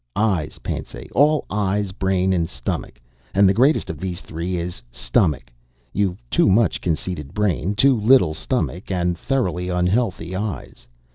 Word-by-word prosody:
"Eyes, 100 -8 0
Pansay - - -5
all 150 +2 +3
Eyes, 100 -1 0
Brain, 95 -1 +1
and 85 -2 0
Stomach. - - -4 0.4
And 100 0 +6
the 95 - +4
greatest 135 +9 +3
of 80 -3 -6
these 90 -1 -4
three 85 +3 -4
is 85 -6 -4
Stomach. 65 -1 0 0.4
You've 90 -11 -1
too - - +4
much 110 +4 +3
conceited 80 -3 -3
Brain, 100 -2 0
too 130 +1 +4
little 110 -8 +5
Stomach, 90 +3 -3
and 90 -2 0
thoroughly 90 - -1
unhealthy 90 0 0
Eyes. 95 - -5
95 Hz, 145 wpm, -22 LUFS, 85-105 Hz, 0.4 s, And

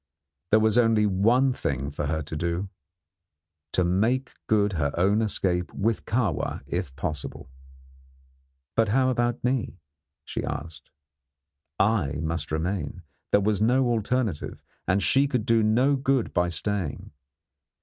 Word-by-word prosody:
There 110 - +5
was 110 +2 +3
only 115 -2 +4
one 115 +7 +3
thing 70 - -3
for 75 0 -3
her 80 +1 -1
to 75 +2 -7
do: 85 +4 -2 1.0
to 90 - +3
make 110 +9 +1 0.2
good 105 -2 +2
her 70 -4 0
own 100 +5 +3
escape 90 -5 0
with 110 +2 0
Kahwa 105 - -1
if 65 - -4
possible. 75 -3 -5 1.2
But 115 -2 +3
how 130 +4 +3
about 120 0 -1
me? 125 -6 -1 0.5
she - - -4
asked. 80 +1 -6 0.9
I 100 -9 +2
must 80 +1 -3
remain. 85 +1 -2 0.3
There 100 - +5
was 105 0 +1
no 125 +3 +3
alternative, 115 -6 -1 0.2
and 100 +1 +2
she 135 +6 +4
could 125 -6 -1
do 115 -1 +3
no 120 +6 +3
good 135 -2 0
by 90 -1 +2
staying. 90 -1 -3
105 Hz, 135 wpm, -26 LUFS, 85-120 Hz, 1.2 s, There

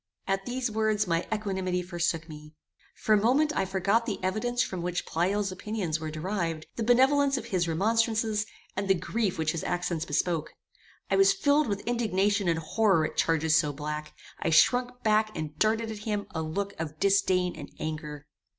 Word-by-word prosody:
At 195 0 -1
these 245 -1 -2
words 215 -1 +1
my 170 -2 0
equanimity 190 -4 -1
forsook 170 -2 -2
me. 150 -1 -11 0.4
For 215 - +1
a 210 - +4
moment 295 +7 +3
I - - +1
forgot 195 +5 +1
the 210 - -2
evidence 240 +6 0
from 185 -6 -4
which 180 0 -2
Pleyel's 195 +4 0
opinions 185 -5 -3
were 155 0 -4
derived, 165 0 -3
the - - -4
benevolence 270 +4 +4
of - - -5
his 180 -3 0
remonstrances, 220 +4 +1 0.3
and 195 +1 -2
the 195 - +4
grief 195 +2 -2
which 160 -1 0
his 165 - -4
accents 175 -2 -2
bespoke; 160 +1 -1 0.6
I 195 - +4
was 195 0 +6
filled 285 +9 +2
with 200 -2 -2
indignation 210 -4 +1
and 165 -1 +2
horror 170 0 +2
at - - -5
charges 160 -1 +2
so 150 -2 0
black; 150 +1 -5 0.3
I - - -1
shrunk 245 +10 +3
back 215 0 +2
and 155 -1 -5
darted 220 +1 +1
at 215 - -7
him 210 -1 -2
a 160 - -3
look 195 +6 -3
of 155 -1 -5
disdain 185 -2 +2
and 145 -2 -8
anger. 150 -2 -5
195 Hz, 180 wpm, -28 LUFS, 165-220 Hz, 0.6 s, was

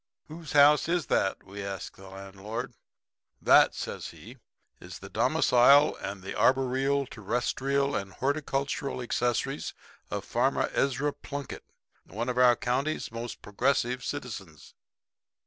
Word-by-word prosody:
"'Whose 160 0 -8
house 150 +2 +6
is 175 -3 +1
that?' 95 - +1
we 100 +1 -8
asked 100 -1 -6
the 95 - -13
landlord. 100 +6 -7 0.7
"'That,' - - +5
says - - -5
he, - - -12 0.4
'is - - -9
the - - -11
domicile 140 +4 +5
and 95 -1 -6
the 95 - -5
arboreal, 135 +2 +2
terrestrial 130 +5 -1
and 100 -1 -3
horticultural 140 0 -2
accessories 125 +3 -1 0.3
of 100 -1 -4
Farmer 130 +3 0
Ezra 140 +2 0
Plunkett, 140 -1 -7 0.4
one 115 +6 -4
of 125 0 -1
our 125 -1 +6
county's 130 +6 -2
most 115 0 -7
progressive 125 +3 0
citizens.' - - -7
125 Hz, 125 wpm, -28 LUFS, 110-140 Hz, 0.7 s, house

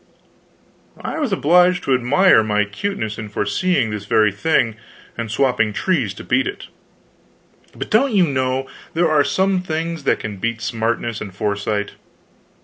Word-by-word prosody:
I - - -4
was 290 -8 -1
obliged 180 +1 +3
to 135 - +1
admire 130 +4 +4
my 105 -1 +1
cuteness 110 - -4
in 110 -2 -6
foreseeing 110 - 0
this 105 -1 -5
very 105 +1 +3
thing 115 0 +1 0.4
and 115 -2 -4
swapping 110 -2 +1
trees 135 - 0
to - - -9
beat - - +1
it. - - -6 1.1
But, - - -6
don't 255 +5 +3
you 185 -3 +5
know, 130 -2 -1 0.3
there 165 -1 +2
are 150 -2 +4
some 190 +4 +1
things 165 -2 -4
that - - +3
can 105 -2 -6
beat 115 +3 -2
smartness 115 +1 -2
and 100 - -6
foresight? 105 +1 -2
125 Hz, 150 wpm, -20 LUFS, 105-170 Hz, 1.1 s, you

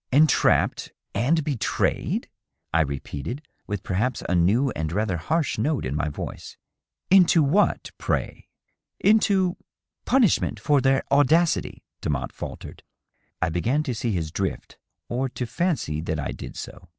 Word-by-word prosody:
" - - -53
Entrapped 150 +4 +3 0.2
and 145 +10 +2
betrayed 140 -6 -1 0.2
?" - - -54
I 80 - +4
repeated, 70 - -4 0.2
with 100 -2 -4
perhaps 115 +7 -1
a - - 0
new 105 +10 +3
and 80 -1 -3
rather 100 -1 0
harsh 155 - -1
note 145 - 0
in 65 +3 -2
my 75 0 0
voice. 70 - -7 0.3
" - - -53
Into 180 -4 +6
what, 175 +9 +2
pray - - -2 0.2
?" - - -50
" - - -60
Into.. 195 -4 +3 0.5
punishment 245 -6 +2
for 145 -3 +3
their 135 +1 +3
audacity," 155 +4 +2 0.2
Demotte 70 -4 -2
faltered. - - -8 0.6
I - - +1
began 120 - 0
to 130 -5 -2
see 115 0 -2
his 80 -5 -2
drift, - - -4 0.3
or 130 +2 -1
to 125 - -4
fancy 115 - -1
that 80 -1 -2
I 70 - -3
did - - -8
so. 90 0 -9
125 Hz, 155 wpm, -25 LUFS, -, 0.6 s, Into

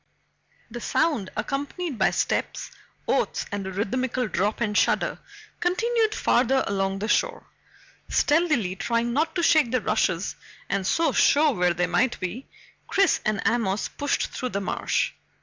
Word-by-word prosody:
The 240 +1 -6
sound, 280 - 0
accompanied 280 - -3
by 190 - +4
steps, - - -2 0.4
oaths, - - 0
and 200 -1 -3
a - - -4
rhythmical 250 +5 -1
drop 205 +2 -1
and 215 -3 -1
shudder, - - +1 0.4
continued 440 +4 +1
farther 265 +2 +2
along 195 -1 -1
the 205 +2 -3
shore. 480 - 0 0.6
Stealthily, 295 - +2
trying 235 +2 0
not 315 +4 0
to 345 - 0
shake 310 -7 +4
the 255 +1 +1
rushes 205 -4 0 0.4
and 195 -2 0
so 330 0 +2
show 300 +1 +4
where 180 -6 +1
they 175 +1 +1
might 240 +6 +1
be, 185 +9 -5 0.4
Chris 390 -3 +2
and 215 -2 -1
Amos 215 -4 0
pushed 285 -1 -1
through 255 - -3
the 200 - -2
marsh. 195 - -1
235 Hz, 150 wpm, -25 LUFS, 200-300 Hz, 0.6 s, by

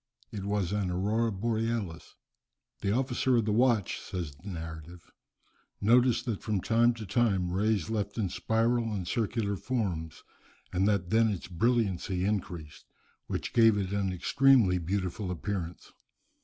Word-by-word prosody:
It 100 -2 -5
was 100 -3 -1
an 100 -3 0
aurora 105 +6 0
borealis. 110 -3 -2 0.6
"The 100 - -1
officer 125 +1 +1
of 115 - +1
the 110 - 0
watch," 115 -3 +2
says 85 -5 -5
the 85 +9 -11
narrative, 85 0 -8 0.7
"noticed 120 +2 +4
that 115 -5 -3
from 105 -3 -1
time 115 +4 +3
to 110 -2 -7
time 100 -4 +1
rays 100 0 +1
left 105 -2 -3
it - - 0
in 95 - 0
spiral 115 +3 0
and 95 -4 -4
circular 110 -1 -1
forms, 95 -8 -3 0.5
and 95 +2 +2
that 100 -3 0
then 110 0 +4
its 100 -5 -4
brilliancy 95 -2 0
increased, 90 -7 -4 0.4
which - - -4
gave 115 -3 +5
it 100 -1 -2
an 100 -2 0
extremely 110 0 +4
beautiful 90 +2 -2
appearance. 90 -1 -4
100 Hz, 145 wpm, -29 LUFS, 90-115 Hz, 0.7 s, gave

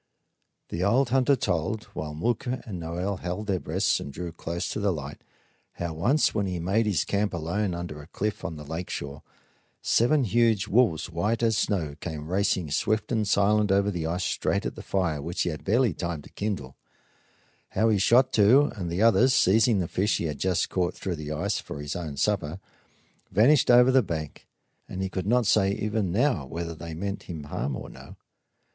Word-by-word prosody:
The 85 - -2
old 120 +6 +3
hunter 135 +2 +3
told, 105 0 -1
while 75 -1 -5
Mooka 120 - -2
and 95 -6 -6
Noel 90 +4 -3
held 90 +4 -4
their 95 -3 0
breaths - - 0
and 70 - -7
drew 85 +4 -6
closer 85 +1 -4
to - - -3
the 100 -1 +1
light, 75 -4 -6 0.5
how 85 -1 -4
once, 120 - +2
when 100 -3 0
he 90 -1 -3
made 100 +6 +1
his 100 -7 +1
camp 100 -2 0
alone 90 +3 -1
under 85 -4 -6
a 75 - -14
cliff 105 +4 -3
on 80 - -4
the 75 - -8
lake 80 +4 -5
shore, 70 0 -5 0.6
seven 130 +5 +3
huge 115 -2 +2
wolves, 100 -7 +2
white 105 +8 -1
as 115 -1 +3
the - - +2
snow, 80 -8 -1
came 80 -3 -6
racing 95 -5 0
swift 110 - 0
and 110 -3 +1
silent 105 +1 +3
over 100 +1 +3
the 85 -4 -3
ice 90 +3 -2
straight - - -1
at - - -2
the - - -9
fire 85 -7 -1
which 85 +4 -2
he - - -1
had 75 -2 -6
barely 115 0 +2
time 85 -3 -4
to - - -15
kindle; 95 -11 -4 1.0
how 110 +1 +4
he 105 -3 +2
shot 125 +6 +4
two, 125 +8 +5
and 90 -4 -4
the 90 +5 0
others, 125 +3 +5
seizing 110 +3 +4
the 90 -3 -1
fish 100 +6 0
he - - -3
had 75 -4 -3
just 90 -2 0
caught 90 -2 0
through 95 -3 -3
the 75 -1 -6
ice 90 +7 -1
for - - -8
his 75 0 -4
own 80 -5 -5
supper, 90 0 0 0.7
vanished 125 +8 +4
over 125 +1 +7
the 130 0 +5
bank; 80 -8 -6 0.4
and 95 +1 -4
he 95 - -2
could 95 0 -4
not 120 +1 +3
say 100 -1 +3
even 105 -2 -1
now 120 - +1
whether 85 +5 -5
they 80 0 -8
meant 100 +4 -5
him 80 -4 -5
harm 70 -2 -3
or - - -7
no. - - -12
95 Hz, 200 wpm, -26 LUFS, 85-110 Hz, 1.0 s, over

